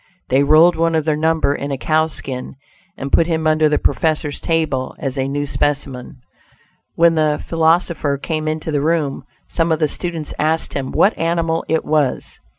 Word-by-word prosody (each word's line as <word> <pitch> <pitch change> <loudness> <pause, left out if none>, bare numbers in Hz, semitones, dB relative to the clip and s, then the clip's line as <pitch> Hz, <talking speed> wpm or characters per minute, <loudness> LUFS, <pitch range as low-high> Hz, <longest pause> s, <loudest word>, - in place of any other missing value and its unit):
They 135 +2 +3
rolled 155 +5 +5
one 165 0 +1
of 155 -2 0
their 155 -1 +1
number 160 -1 +1
in 140 0 -4
a 135 - -2
cow 155 +3 +1
skin 130 -5 -4 0.4
and 135 +1 -5
put 165 - +3
him 160 -2 -1
under 155 0 +3
the 150 - +2
professor's 155 -2 -1
table 155 -6 -1
as 135 -2 -4
a 135 -1 -1
new 145 +1 -2
specimen. 135 -3 -3 0.7
When 170 0 +4
the 155 -2 +1
philosopher 165 -3 +1
came 155 +2 -3
into 155 +1 -3
the 145 -2 0
room, 155 -2 -1 0.2
some 165 0 0
of 160 - +2
the 155 -1 +1
students 165 -1 -4
asked 160 +2 0
him 135 -2 -3
what 210 - +3
animal 165 0 0
it 160 - 0
was. 150 -4 -1
155 Hz, 180 wpm, -18 LUFS, 145-165 Hz, 0.7 s, rolled